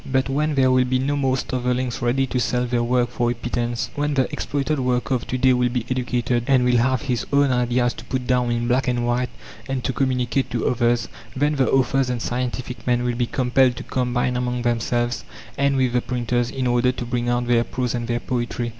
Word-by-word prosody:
But 130 0 +1
when 150 +2 0
there 130 -1 +4
will 130 0 +4
be 130 +1 +1
no 140 +3 0
more 135 -2 +1
starvelings 125 -1 -2
ready 125 +3 +1
to 125 -1 -2
sell 125 +2 0
their 120 -1 0
work 120 0 +1
for 120 -1 0
a 120 - -1
pittance, 120 -1 -3
when 145 0 -1
the 130 -2 +2
exploited 145 +1 -1
worker 125 0 0
of 125 - -2
to 130 - -2
day 130 0 +4
will 125 0 +2
be 120 -2 -2
educated, 120 -1 0
and 130 -2 +4
will 125 -1 +3
have 130 +4 +1
his 125 -4 -1
own 140 -1 +4
ideas 120 -1 +1
to - - -11
put 130 -1 -3
down 125 -1 +1
in 120 0 -1
black 130 +2 +1
and 120 -1 0
white 120 +1 0 0.4
and 135 -2 -2
to 130 - -1
communicate 130 -1 0
to 115 - -2
others, 120 -1 +1 0.3
then 145 +3 +1
the 135 -2 +2
authors 135 0 +2
and 125 -1 -1
scientific 125 +1 -4
men 120 0 +2
will 125 0 0
be 120 0 -1
compelled 125 0 +2
to - - -7
combine 125 0 -1
among 125 0 -1
themselves 120 0 0 0.3
and 140 0 +1
with 130 -2 +1
the 125 - +2
printers, 120 -1 -1
in 130 -1 -3
order 120 +1 +3
to 125 - -6
bring 120 0 -1
out 120 0 0
their 120 -1 +3
prose 125 0 -3
and 120 -1 -3
their 120 0 0
poetry. 120 -1 -2
125 Hz, 225 wpm, -22 LUFS, 120-130 Hz, 0.4 s, there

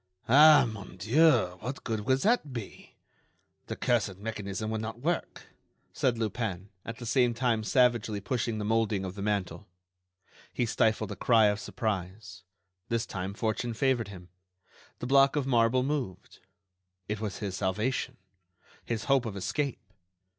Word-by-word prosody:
"Ah! 145 +1 +7
mon 100 -4 -9
dieu, 110 - +3
what 125 +7 -6
good 110 -3 -3
would 130 0 +2
that 220 - +2
be? 115 -5 -8 0.7
The - - -4
cursed 115 -6 0
mechanism 105 0 -4
will 110 - -2
not 110 +1 -5
work," 170 +4 -3 0.4
said 120 -2 +1
Lupin, 105 -4 -3
at 115 +1 -7
the 120 - -8
same 120 0 +2
time 115 -2 +1
savagely 120 -3 +2
pushing 115 +1 -2
the 105 - -3
moulding 110 -3 +1
of 90 - -5
the 100 - -8
mantel. 100 -3 -2 0.8
He 120 - 0
stifled 110 -1 +1
a - - -4
cry 115 +2 +4
of 105 0 -1
surprise; 95 -4 -4 0.5
this 115 0 0
time 95 0 -5
fortune 115 +1 -2
favored 130 -3 +1
him—the 90 +3 -14
block 135 +2 +4
of 145 -3 0
marble 125 0 +3
moved. 135 - -4 0.7
It 105 0 -3
was 105 -4 -4
his 100 -3 -4
salvation; 105 +7 -1 0.7
his 115 -2 -3
hope 135 -2 +2
of 105 - -5
escape. 140 +7 -2
110 Hz, 145 wpm, -29 LUFS, 100-125 Hz, 0.8 s, Ah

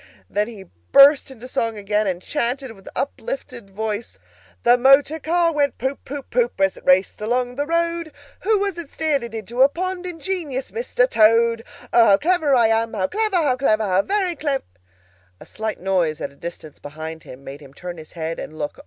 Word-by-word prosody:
Then 210 +1 0
he 215 -5 -10
burst 270 - +5
into 250 -2 -11
song 230 -3 -2
again, 210 +1 0
and 185 -1 -2
chanted 260 -2 -2
with 195 -3 -13
uplifted 270 - -5
voice— 215 +2 -4 0.5
"The 240 +1 +6
motor 275 +5 +4
car 335 +2 +1
went 285 -3 +1
Poop 265 +3 -3
poop 280 0 -7
poop, 240 -4 0
As 195 -1 +2
it - - -14
raced 185 +3 +3
along 245 +3 0
the 285 +3 -3
road. 335 -1 -1 0.3
Who 430 +2 +2
was 395 -3 -2
it 330 -4 -8
steered 310 -4 0
it 230 -1 -7
into 225 +3 -3
a 270 - +7
pond? 365 +3 -4
Ingenious 330 -6 -4
Mr. - - +1
Toad! 230 - +4 0.3
O, 235 - +7
how 195 - +6
clever 315 - +2
I 235 -2 +4
am! 225 0 +1
How 190 -3 0
clever, 430 - -1
how 305 -7 +3
clever, 220 -4 +2
how 185 0 +3
very 380 - -1
clev——" 285 -4 -2 0.8
A - - -12
slight 220 -1 -5
noise 180 -5 0
at - - -4
a - - -21
distance 160 -1 -9
behind 160 +2 -8
him 130 +2 -12
made 140 +2 -9
him 140 -2 -14
turn 175 +1 -7
his 155 - -13
head 165 -1 -4
and 155 - -8
look. 150 -1 -5
240 Hz, 195 wpm, -21 LUFS, 195-310 Hz, 0.8 s, a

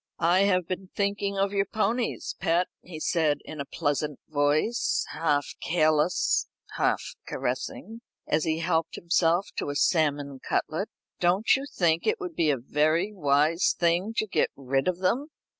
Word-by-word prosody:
"I 180 +4 +3
have 185 -3 +2
been 185 0 -5
thinking 200 0 -1
of 195 +1 +1
your 200 0 +1
ponies, 225 +3 -1
pet," 175 0 +2 0.2
he 170 -3 -9
said, 155 -2 +1
in 155 -2 -6
a - - -4
pleasant 145 0 -2
voice, 150 +10 +1
half 150 -3 +1 0.2
careless, 155 0 +2 0.3
half - - +1 0.2
caressing, 225 +1 -4 0.2
as 155 0 +1
he 160 0 0
helped 165 -1 0
himself 170 +2 +1
to - - -2
a 145 - -3
salmon 145 -3 +1
cutlet. - - -2 0.3
"Don't 185 +5 +3
you 275 +1 -4
think 165 -2 +1
it 440 0 +2
would 365 -3 -5
be 160 - +2
a 140 - +2
very 155 - +1
wise 150 0 +2
thing 175 +6 +1
to - - +2
get 205 - +1
rid 135 +2 -1
of 180 -1 +1
them?" 240 +10 +1
170 Hz, 160 wpm, -27 LUFS, 150-195 Hz, 0.3 s, I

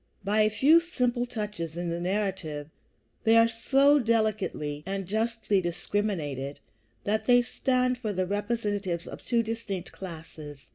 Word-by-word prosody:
By 210 +2 +2
a 215 - +4
few 290 +9 +5
simple 250 -8 -1
touches 205 -9 -5
in 175 -1 -2
the 170 - -2
narrative 180 -6 -2 0.5
they 225 +1 +5
are 230 0 +7
so 275 +5 +4
delicately 215 - 0
and 195 +1 -3
justly 220 0 0
discriminated 170 -6 -2 0.4
that 215 +1 0
they 245 -1 +5
stand 250 0 0
for 220 -4 -2
the 185 -2 0
representatives 205 -3 -2
of - - -9
two 235 -1 +1
distinct 225 -5 -4
classes. 155 -5 -9
210 Hz, 140 wpm, -28 LUFS, 175-230 Hz, 0.5 s, are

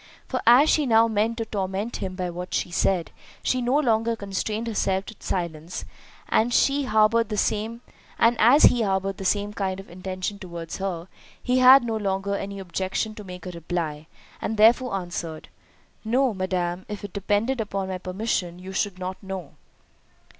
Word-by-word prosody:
For 255 - -2
as 250 +6 +8
she 300 -3 +3
now 225 -1 +5
meant 220 +1 0
to 225 - -2
torment 200 +1 -3
him 185 -1 -4
by 180 -1 -3
what 180 +1 -5
she 175 - -1
said, 175 -1 +1 0.3
she 255 - +1
no 245 +3 +1
longer 230 -5 +2
constrained 210 +2 -3
herself 195 -4 0
to 220 - -9
silence—and 170 +5 -3
as - - +5
he 280 0 -1
harboured 220 0 +3
the 210 - -2
same 220 +3 -1 1.7
kind 190 -2 -2
intention 185 +2 -5
towards 170 -3 -7
her, 185 -3 -4 0.3
he 255 +1 +1
had 255 +1 +8
no 225 -2 -1
longer 200 -1 -1
any 200 0 -4
objection 190 +3 -2
to 210 - -9
make 180 -1 -9
a 180 - -5
reply, 165 -3 -4 0.3
and 220 - -2
therefore 235 +1 +5
answered, 175 -3 -5 0.5
"No, 245 +2 +2
madam, 185 -2 -2
if 210 0 -6
it 200 - -7
depended 210 +5 0
upon 195 -2 -3
my 185 -1 -4
permission, 185 -2 -2
you 185 +1 -9
should 190 0 -1
not 185 0 -5
know." 190 -6 -6
200 Hz, 155 wpm, -25 LUFS, 185-225 Hz, 1.7 s, as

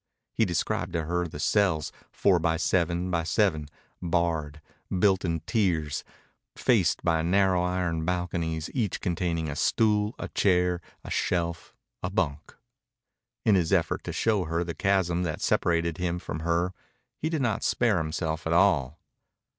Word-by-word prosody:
He 110 - +2
described 85 -2 -1
to 85 -2 0
her 90 +2 -1
the 75 - -9
cells, 90 -5 +1 0.2
four 95 -3 +3
by 80 0 +1
seven 85 +1 0
by 85 -2 +1
seven, 85 -3 +1 0.3
barred, 80 -3 -1 0.3
built 95 0 +2
in 85 -3 -1
tiers, 85 -6 0 0.5
faced 100 -10 +2
by 80 -2 +2
narrow 95 +1 +3
iron 90 -2 -1
balconies, 85 -2 -2
each 115 -8 -1
containing 85 -2 -1
a 70 - -4
stool, 105 - +2
a - - -5
chair, 90 -2 +2 0.2
a - - -8
shelf, 85 -2 -1 0.3
a 90 - -2
bunk. 80 -7 -2 0.9
In 110 - +5
his 90 -4 +2
effort 90 -4 +1
to - - -3
show 105 -5 +1
her 85 +2 -1
the 85 -1 -4
chasm 95 -3 +1
that 80 -4 -2
separated 85 -1 +1
him 90 -1 -1
from 80 -3 -5
her 85 +3 0 0.5
he 155 - -1
did 160 -4 -1
not 110 -5 0
spare 115 -5 +2
himself 80 +1 -3
at 80 - +1
all. 85 -6 +3
85 Hz, 155 wpm, -27 LUFS, 80-95 Hz, 0.9 s, In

